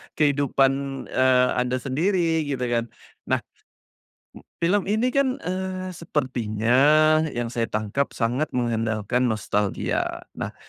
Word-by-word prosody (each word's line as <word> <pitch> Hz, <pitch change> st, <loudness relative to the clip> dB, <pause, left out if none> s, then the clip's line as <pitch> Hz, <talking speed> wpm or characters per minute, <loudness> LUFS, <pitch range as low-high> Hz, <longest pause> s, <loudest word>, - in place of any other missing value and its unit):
kehidupan, 140 Hz, -2 st, +3 dB, 0.4 s
eee, 130 Hz, -1 st, +4 dB
Anda 125 Hz, 0 st, 0 dB
sendiri, 160 Hz, +2 st, +1 dB
gitu 130 Hz, -3 st, -2 dB
kan. 120 Hz, -1 st, 0 dB, 0.4 s
Nah, -, -, 0 dB, 1.0 s
m -, -, -16 dB, 0.2 s
film 190 Hz, +4 st, +2 dB
ini 220 Hz, +5 st, +1 dB
kan, 265 Hz, -1 st, +1 dB
eee, 185 Hz, 0 st, -3 dB
sepertinya 125 Hz, -8 st, -1 dB, 0.6 s
yang 120 Hz, -1 st, -2 dB
saya 115 Hz, -1 st, -1 dB
tangkap 110 Hz, +7 st, -2 dB
sangat 125 Hz, +6 st, 0 dB
mengandalkan 115 Hz, 0 st, 0 dB
nostalgia. 105 Hz, -2 st, -1 dB, 0.2 s
Nah, -, -, -4 dB
130 Hz, 110 wpm, -24 LUFS, 115-170 Hz, 1.0 s, eee